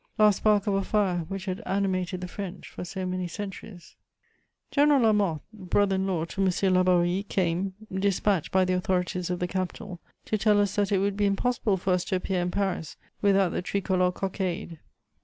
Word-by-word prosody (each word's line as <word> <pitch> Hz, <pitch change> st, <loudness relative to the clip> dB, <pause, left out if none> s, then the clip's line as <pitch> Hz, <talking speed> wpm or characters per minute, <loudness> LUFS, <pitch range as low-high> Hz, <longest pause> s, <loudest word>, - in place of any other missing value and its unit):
Last 210 Hz, -2 st, +5 dB
spark 210 Hz, -2 st, +3 dB
of 205 Hz, -, +1 dB
a 195 Hz, 0 st, +1 dB
fire 190 Hz, -6 st, 0 dB
which 195 Hz, 0 st, -5 dB
had 185 Hz, -1 st, -3 dB
animated 185 Hz, -2 st, -1 dB
the 180 Hz, -, -4 dB
French 190 Hz, 0 st, -7 dB
for -, -, -8 dB
so 185 Hz, +1 st, -5 dB
many 185 Hz, 0 st, -2 dB
centuries. 195 Hz, -1 st, -8 dB, 0.8 s
General 290 Hz, -1 st, +4 dB
Lamothe, 205 Hz, -9 st, +2 dB
brother 200 Hz, 0 st, +1 dB
in 190 Hz, 0 st, -1 dB
law 170 Hz, -4 st, 0 dB
to 195 Hz, -, -4 dB
M. 190 Hz, 0 st, +2 dB
Laborie, 180 Hz, 0 st, +3 dB
came, 185 Hz, +1 st, 0 dB, 0.2 s
despatched 195 Hz, -2 st, +1 dB
by 190 Hz, 0 st, +3 dB
the 185 Hz, -, 0 dB
authorities 180 Hz, -1 st, -1 dB
of 180 Hz, -, -1 dB
the 180 Hz, -, -2 dB
capital, 185 Hz, +1 st, -4 dB, 0.3 s
to 215 Hz, -, -1 dB
tell 210 Hz, 0 st, +4 dB
us 205 Hz, -1 st, +1 dB
that 205 Hz, -1 st, +1 dB
it 200 Hz, -, +3 dB
would 195 Hz, +1 st, 0 dB
be 205 Hz, -1 st, +2 dB
impossible 205 Hz, 0 st, +1 dB
for 185 Hz, +1 st, 0 dB
us 180 Hz, -1 st, +1 dB
to -, -, -1 dB
appear 185 Hz, 0 st, -1 dB
in 175 Hz, -, -1 dB
Paris 180 Hz, -5 st, -2 dB, 0.2 s
without 195 Hz, -2 st, +4 dB
the -, -, -2 dB
tricolour 185 Hz, -1 st, +1 dB
cockade. 185 Hz, -2 st, -3 dB
190 Hz, 190 wpm, -27 LUFS, 180-200 Hz, 0.8 s, Last